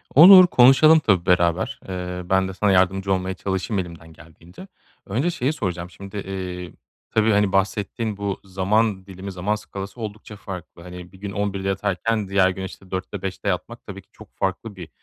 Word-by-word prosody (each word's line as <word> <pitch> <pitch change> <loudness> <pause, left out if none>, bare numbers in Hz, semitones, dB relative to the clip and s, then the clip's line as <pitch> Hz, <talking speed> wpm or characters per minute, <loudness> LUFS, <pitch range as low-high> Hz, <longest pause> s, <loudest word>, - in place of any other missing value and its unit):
Olur, 185 +4 +10
konuşalım 155 +4 +6
tabii 95 - +1
beraber. 90 0 +1
Eee, 90 -1 -5
ben 95 0 +2
de 95 - -6
sana 100 +1 +1
yardımcı 95 +1 +2
olmaya 95 0 -2
çalışayım 95 +1 -2
elimden 85 -2 -8
geldiğince. 85 - -15 0.4
Önce 130 - -1
şeyi 145 -2 -1
soracağım, 90 - -4
şimdi, 100 +2 -10
eee, 90 -2 -6 0.4
tabii, 110 0 +2
hani, 100 -1 +2
bahsettiğin 105 +2 -1
bu 100 -1 -3
zaman 95 +1 0
dilimi, 95 0 -8
zaman 95 +4 -1
skalası 100 +2 -8
oldukça 105 0 -7
farklı. 90 -4 -9
Hani, 90 0 -10
bir 95 - -17
gün 100 -1 -6
11'de 100 -1 -3
yatarken 100 +2 -1
diğer 95 -1 +3
gün, 95 0 -5
işte, 95 0 -10
4'te 95 +1 -5
5'te 95 -2 -5
yatmak - - -4
tabii - - -9
ki - - -36
çok - - -17
farklı 95 +3 -3
bir 90 -4 -10
95 Hz, 175 wpm, -22 LUFS, 90-105 Hz, 0.4 s, Olur